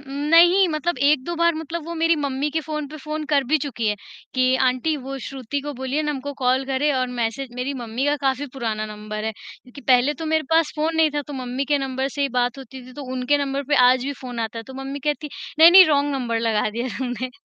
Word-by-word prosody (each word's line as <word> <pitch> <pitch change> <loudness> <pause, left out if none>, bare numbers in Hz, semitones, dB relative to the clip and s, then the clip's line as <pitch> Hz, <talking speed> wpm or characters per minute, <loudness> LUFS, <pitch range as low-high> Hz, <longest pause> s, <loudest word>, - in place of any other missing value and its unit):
उम, 275 -1 -11 0.2
नहीं 350 +3 +7
मतलब 310 -1 -2
1-2 300 +3 +2
बार 335 0 +3
मतलब 320 +1 -5
वो 340 - -5
मेरी 330 0 +3
मम्मी 285 0 -2
के 320 +2 -1
फ़ोन 305 -1 -4
पे 310 - -9
फ़ोन 305 +1 -5
कर 280 -2 +3
भी 310 - +4
चुकी 235 -6 -2
है, 210 - 0 0.4
कि 255 0 +3
आंटी 255 +5 0
वो 270 0 -6
श्रुति 270 +1 -4
को 290 +1 -5
बोलिए 265 +4 -2
ना 300 - -1
हमको 285 0 -4
कॉल 255 +2 +2
करें 275 +2 +1
और 255 -1 +1
मैसेज 235 +4 -2
मेरी 255 +3 -3
मम्मी 235 +3 -3
का 290 0 +2
काफ़ी 270 +2 0
पुराना 220 -5 -3
नंबर 215 0 -6
है। 220 - -1
क्योंकि 250 +5 -14
पहले 260 +2 +3
तो - - -3
मेरे 315 0 +1
पास 325 -2 +3
फ़ोन 320 +2 0
नहीं 320 -1 +4
था, 290 - -1
तो 290 - -10
मम्मी 255 0 -3
के 290 +1 +1
नंबर 265 0 -2
से 285 +1 -3
ही 280 - +1
बात 245 +1 0
होती 265 -1 -10
थी, 255 - -12
तो 285 - -8
उनके 260 +3 +1
नंबर 280 0 -2
पे 295 - +3
आज 255 0 +2
भी 280 - -2
फ़ोन 245 -2 -5
आता 225 0 -3
है, - - -5
तो 265 - -11
मम्मी 275 +1 -5
कहती, 295 +1 -2 0.3
"नहीं-नहीं 345 +4 +10
रॉन्ग 290 -1 +2
नंबर 240 -4 -1
लगा 215 -1 +1
दिया 235 +4 -3
तुमने।" 255 -1 -3
275 Hz, 245 wpm, -22 LUFS, 255-300 Hz, 0.4 s, नहीं-नहीं